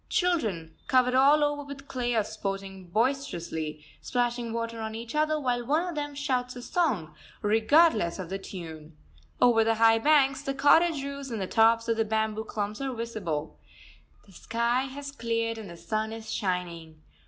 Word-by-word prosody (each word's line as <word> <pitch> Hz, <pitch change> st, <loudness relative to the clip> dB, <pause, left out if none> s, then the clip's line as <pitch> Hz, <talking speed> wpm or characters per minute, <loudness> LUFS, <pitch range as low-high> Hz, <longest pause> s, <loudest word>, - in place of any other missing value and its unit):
Children, 215 Hz, -, 0 dB
covered 250 Hz, -1 st, +3 dB
all 280 Hz, +3 st, +5 dB
over 290 Hz, 0 st, 0 dB
with 280 Hz, 0 st, -10 dB
clay, 245 Hz, -5 st, -1 dB
are 220 Hz, -, +3 dB
sporting 195 Hz, -2 st, -5 dB
boisterously, 170 Hz, -, -2 dB, 0.2 s
splashing 240 Hz, -1 st, -1 dB
water 230 Hz, 0 st, -3 dB
on 220 Hz, 0 st, -4 dB
each 230 Hz, 0 st, -7 dB
other, 305 Hz, 0 st, +1 dB
while 245 Hz, -3 st, -1 dB
one 305 Hz, +8 st, +1 dB
of 350 Hz, -, -4 dB
them 290 Hz, -1 st, -4 dB
shouts 255 Hz, -3 st, -1 dB
a 245 Hz, -, -8 dB
song, 225 Hz, -, 0 dB, 0.3 s
regardless 220 Hz, -, +4 dB
of 185 Hz, -3 st, -6 dB
the 195 Hz, -, -2 dB
tune. 160 Hz, -5 st, -9 dB, 0.4 s
Over 235 Hz, -2 st, +5 dB
the 225 Hz, 0 st, +2 dB
high 225 Hz, 0 st, +5 dB
banks, 275 Hz, 0 st, +3 dB
the 275 Hz, -1 st, -3 dB
cottage 295 Hz, +2 st, +4 dB
roofs 280 Hz, -1 st, -6 dB
and 225 Hz, -3 st, -4 dB
the 190 Hz, -, -1 dB
tops 225 Hz, +3 st, +3 dB
of 230 Hz, -1 st, +1 dB
the 225 Hz, -, +3 dB
bamboo 220 Hz, 0 st, -1 dB
clumps 210 Hz, +2 st, -4 dB
are 270 Hz, -1 st, -2 dB
visible. 200 Hz, -10 st, -4 dB, 0.7 s
The 200 Hz, -, -19 dB
sky 235 Hz, +6 st, 0 dB
has 280 Hz, +1 st, -7 dB
cleared 230 Hz, -3 st, -2 dB
and 210 Hz, -4 st, -8 dB
the 170 Hz, -, -10 dB
sun 215 Hz, +4 st, -2 dB
is 225 Hz, 0 st, -6 dB
shining. 170 Hz, -5 st, -3 dB
230 Hz, 175 wpm, -28 LUFS, 205-275 Hz, 0.7 s, all